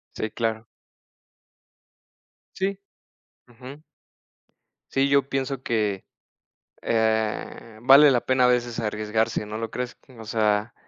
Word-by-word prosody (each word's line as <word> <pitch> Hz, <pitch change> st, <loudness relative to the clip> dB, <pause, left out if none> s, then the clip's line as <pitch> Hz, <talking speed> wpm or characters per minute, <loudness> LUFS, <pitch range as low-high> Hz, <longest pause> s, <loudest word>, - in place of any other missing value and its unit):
Sí, 110 Hz, -, -3 dB
claro. 115 Hz, 0 st, -3 dB, 1.9 s
Sí, 195 Hz, +1 st, -2 dB, 0.7 s
ujú. 130 Hz, +5 st, -12 dB, 1.1 s
Sí, 135 Hz, +1 st, +2 dB
yo 140 Hz, -1 st, +2 dB
pienso 135 Hz, -1 st, -3 dB
que, 105 Hz, -4 st, -1 dB, 0.8 s
eh, 110 Hz, 0 st, -1 dB
vale 135 Hz, +3 st, +7 dB
la 120 Hz, -, +2 dB
pena 130 Hz, -1 st, +2 dB
a -, -, +5 dB
veces 120 Hz, -1 st, 0 dB
arriesgarse, 110 Hz, 0 st, -1 dB
¿no 105 Hz, +1 st, -6 dB
lo 115 Hz, -1 st, -4 dB
crees? 125 Hz, +1 st, -5 dB, 0.2 s
O 110 Hz, -, -9 dB
sea, 110 Hz, 0 st, 0 dB
115 Hz, 110 wpm, -24 LUFS, 110-130 Hz, 1.9 s, vale